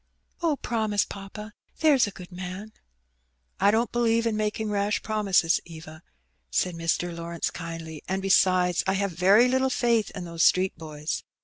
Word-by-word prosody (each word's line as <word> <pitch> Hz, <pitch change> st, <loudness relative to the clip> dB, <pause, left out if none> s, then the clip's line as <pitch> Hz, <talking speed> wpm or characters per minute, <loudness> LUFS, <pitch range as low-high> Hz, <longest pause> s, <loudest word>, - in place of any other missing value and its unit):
"Oh, 325 Hz, -3 st, +2 dB
promise, 220 Hz, -6 st, 0 dB
papa, 210 Hz, +2 st, -9 dB, 0.3 s
there's 290 Hz, -8 st, +4 dB
a -, -, -5 dB
good 180 Hz, -1 st, -11 dB
man." 185 Hz, +4 st, -7 dB, 0.9 s
"I 200 Hz, -, +5 dB
don't 225 Hz, +3 st, +1 dB
believe 230 Hz, -1 st, +2 dB
in 225 Hz, -2 st, 0 dB
making 215 Hz, 0 st, -2 dB
rash 205 Hz, 0 st, 0 dB
promises, 200 Hz, -6 st, +2 dB
Eva," 160 Hz, -1 st, -11 dB, 0.5 s
said 180 Hz, -, 0 dB
Mr. 170 Hz, +1 st, -1 dB
Lawrence 170 Hz, 0 st, -3 dB
kindly; 165 Hz, -2 st, -7 dB
"and, 190 Hz, +1 st, -1 dB
besides, 185 Hz, -2 st, +3 dB
I 190 Hz, -, +2 dB
have 200 Hz, 0 st, -1 dB
very 195 Hz, +8 st, +5 dB
little 260 Hz, +1 st, +2 dB
faith 235 Hz, -4 st, +1 dB
in 180 Hz, -2 st, -5 dB
those 170 Hz, -1 st, -4 dB
street 185 Hz, +2 st, +3 dB
boys. 150 Hz, -1 st, -5 dB
195 Hz, 155 wpm, -26 LUFS, 175-220 Hz, 0.9 s, I